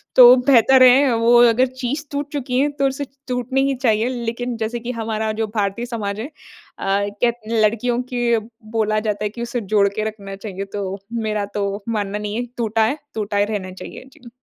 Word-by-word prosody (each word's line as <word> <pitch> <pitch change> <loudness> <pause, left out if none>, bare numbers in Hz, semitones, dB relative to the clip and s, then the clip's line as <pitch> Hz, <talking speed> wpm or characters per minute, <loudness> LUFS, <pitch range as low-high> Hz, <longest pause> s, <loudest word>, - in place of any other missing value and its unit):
तो 250 0 +10
बेहतर 265 0 +6
है 255 +2 +7
अ, - - +1
वो 230 +1 +3 0.2
अगर 250 +3 +3 0.2
चीज़ 280 +5 -2
टूट 285 0 -4
चुकी 255 -3 -1
हैं 290 +2 +2
तो 275 - +3
उसे 275 +2 -3 0.2
टूटनी 255 +1 -1
ही 275 - 0
चाहिए। 235 -2 +1
लेकिन 240 0 -3
जैसे 225 +2 -3
कि 240 +2 -4
हमारा 220 -2 -2
जो 220 - 0
भारतीय 205 +3 -1
समाज 215 -4 -4
है, 225 - -3
अ, 310 - -19 0.5
कहत 205 +4 0
लड़कियों 230 +2 +1
की 240 -1 +1
अ, 230 - +3 0.2
बोला 215 -1 0
जाता 210 -1 -2
है 210 - 0
कि 235 +3 -9
उसे 235 0 -3
जोड़के 200 +1 +2
रखना 200 -2 -9
चाहिए। 195 -1 -6
तो 195 -1 -3 0.3
मेरा 215 -1 -1
तो 200 0 -2
मानना 210 -2 -2
नहीं 210 0 -4
है 240 +2 -2
टूटा 225 -1 +1
है, 265 +7 -1 0.2
टूटा 210 -1 -2
ही 205 - +3
रहना 205 -3 -4
चाहिए 185 - -10
जी। 255 -7 -15
225 Hz, 205 wpm, -20 LUFS, 210-245 Hz, 0.5 s, तो